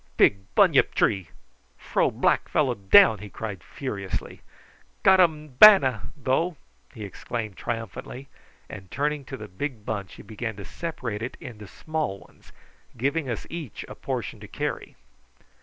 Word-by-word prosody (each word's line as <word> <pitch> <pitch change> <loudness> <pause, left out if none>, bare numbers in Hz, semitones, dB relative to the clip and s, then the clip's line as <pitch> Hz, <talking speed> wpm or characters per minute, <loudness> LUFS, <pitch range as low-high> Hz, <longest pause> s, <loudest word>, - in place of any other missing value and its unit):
"Big 100 - +5 0.2
bunyip - - +4
tree! 95 -5 +1 0.5
Fro - - +1
black - - +1
fellow 135 -5 +2
down," 110 - +6
he 105 +1 -9
cried 100 -5 -6
furiously. 100 -8 -5 0.6
"Got 190 0 +6
um 155 -4 +3
bana, 135 - +8
though!" 150 +5 0 0.3
he 110 -5 -9
exclaimed 110 +1 -5
triumphantly, 120 +5 -6 0.4
and 95 -1 -10
turning 145 +4 -1
to 135 0 -7
the 110 -2 -8
big 110 +3 -5
bunch 100 -4 -4
he - - -12
began 110 0 -5
to 100 -1 -9
separate 125 -11 -5
it 125 - -5
into 105 -4 -9
small 155 -5 -3
ones, 85 - -20 0.5
giving 140 +3 -1
us 115 - -4
each 165 - -7
a - - -8
portion - - -4
to - - -10
carry. - - -4
120 Hz, 145 wpm, -25 LUFS, 105-150 Hz, 0.6 s, bana